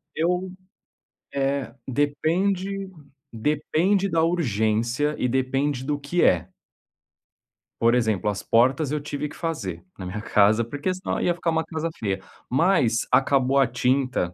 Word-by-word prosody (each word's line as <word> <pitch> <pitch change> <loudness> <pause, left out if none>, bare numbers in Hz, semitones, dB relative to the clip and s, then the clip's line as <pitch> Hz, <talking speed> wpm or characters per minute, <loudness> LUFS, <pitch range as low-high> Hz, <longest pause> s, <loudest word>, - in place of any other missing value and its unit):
Eu 180 +3 0 0.8
eh, 140 -2 -1
depende 180 +8 0 0.4
depende 155 - +1
da 165 -3 +1
urgência 120 - 0
e 125 - 0
depende 130 +1 0
do 145 0 -1
que 155 +5 0
é. 90 +1 +2 1.3
Por 115 +1 +4
exemplo, 110 -4 +1
as 100 - -3
portas 130 +5 +2
eu 150 - 0
tive 145 0 -4
que - - -12
fazer 100 - -4
na 95 - -7
minha 100 +4 -5
casa 105 +1 +3
porque 145 +9 -3
senão 185 +1 -3
ia 175 - +2
ficar 170 -1 -1
uma 160 0 +1
casa 160 +1 -3
feia. 100 -3 -2 0.3
Mas 135 -6 +2
acabou 135 0 +3
a 135 - +4
tinta 125 -6 0
140 Hz, 140 wpm, -24 LUFS, 115-165 Hz, 1.3 s, Por